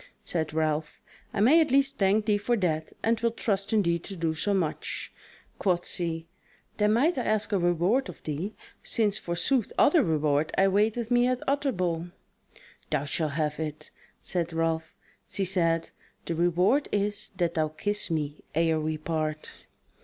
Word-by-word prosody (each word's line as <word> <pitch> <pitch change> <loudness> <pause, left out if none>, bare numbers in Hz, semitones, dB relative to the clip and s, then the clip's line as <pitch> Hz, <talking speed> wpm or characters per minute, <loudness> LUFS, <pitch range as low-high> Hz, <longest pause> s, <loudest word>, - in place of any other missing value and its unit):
Said 160 -3 -2
Ralph: 155 -1 -1 0.3
"I 200 - -1
may 295 +10 +6
at 315 - +1
least 275 +1 +2
thank 200 +2 +3
thee 210 -1 +2
for 235 +4 +1
that, 160 -5 -1
and 225 0 +2
will 235 - +2
trust 200 -3 -1
in 215 -2 +3
thee 170 -1 +1
to 195 +3 -7
do 165 -2 -1
so 180 +6 -1
much." 185 -6 -2 0.5
Quoth 180 -3 +1
she: 165 -2 -3 0.5
"Then 210 0 +3
might 275 +6 +2
I - - -1
ask 215 0 0
a 200 - +2
reward 175 +9 +2
of - - -11
thee: 160 +8 -4 0.3
since 215 -2 +1
forsooth 190 +8 0
other 315 +2 +5
reward 155 - +1
awaiteth 210 +5 +2
me 245 0 +4
at 255 0 -2
Utterbol." 185 - 0 0.8
"Thou 150 -2 0
shalt 150 0 -1
have 150 0 -1
it," 155 -1 -5 0.3
said 170 -2 -2
Ralph. 165 0 -1 0.3
She 195 - -2
said: 165 -3 +1 0.3
"The 170 - -2
reward 175 - +2
is 205 +1 -1
that 170 -2 +1
thou 155 -1 +1
kiss 205 +8 0
me 150 -2 -3
ere 160 -1 +2
we 155 0 -2
part." 155 -1 -3
180 Hz, 165 wpm, -27 LUFS, 160-215 Hz, 0.8 s, may